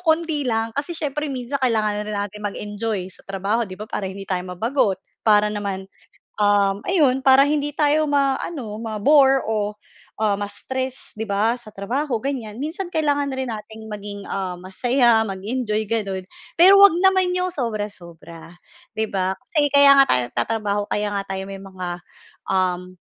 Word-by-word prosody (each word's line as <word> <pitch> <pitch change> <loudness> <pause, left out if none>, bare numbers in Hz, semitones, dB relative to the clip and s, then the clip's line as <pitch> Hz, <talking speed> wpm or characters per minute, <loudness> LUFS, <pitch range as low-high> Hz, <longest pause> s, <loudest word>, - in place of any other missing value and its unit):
kaunti 320 -3 +1
lang, 225 0 0
kasi 290 +5 -2
siyempre 295 -1 -2
minsan 255 +2 -3
kailangan 215 -4 +1
rin 210 - -3
natin 205 +1 -4
mag-enjoy 205 -1 -3
sa - - -16
trabaho, 200 +4 0
'di 185 - -8
ba, 210 - -7
para 190 - -3
hindi 195 +1 -8
tayo 185 -2 0
mabagot. 220 -1 +1 0.3
Para 210 -1 +5
naman, 200 -2 -4 0.6
uhm, 205 -1 +2
ayon 285 -8 +3
para 270 +1 +7
hindi 295 -1 0
tayo 300 +1 +2
maano, 275 -4 -1
ma-bore 265 +5 +4
o, 210 -1 -1 0.5
ah, 210 -2 +2
ma-stress, 260 +6 -5
'di 220 - -3
ba, 215 +4 +1
sa 220 -3 -11
trabaho, 235 +5 -2
ganyan. 245 -4 -4
Minsan 345 +4 -4
kailangan 290 -3 0
na - - -4
rin 260 - -3
nating 220 0 -8
maging, 205 -1 -7
ah, 185 -2 -3
masaya, 235 +4 +2
mag-enjoy, 215 +2 -2
gano'n 195 -4 -2 0.4
pero 385 +3 +9
huwag 400 -3 +9
naman 375 -1 +3
'yong 365 0 0
sobra-sobra, 185 - -6 0.4
'di 220 -1 -1
ba? 190 -1 0
Kasi 290 +2 0
kaya 280 0 +7
nga 275 - +8
tayo 125 - +4
nagtatrabaho, 210 - -1
kaya 210 0 0
nga 200 - -1
tayo 190 0 -4
may 195 - -6
mga, 185 -2 -7 0.7
uhm, 185 -1 0
220 Hz, 160 wpm, -22 LUFS, 200-275 Hz, 0.7 s, pero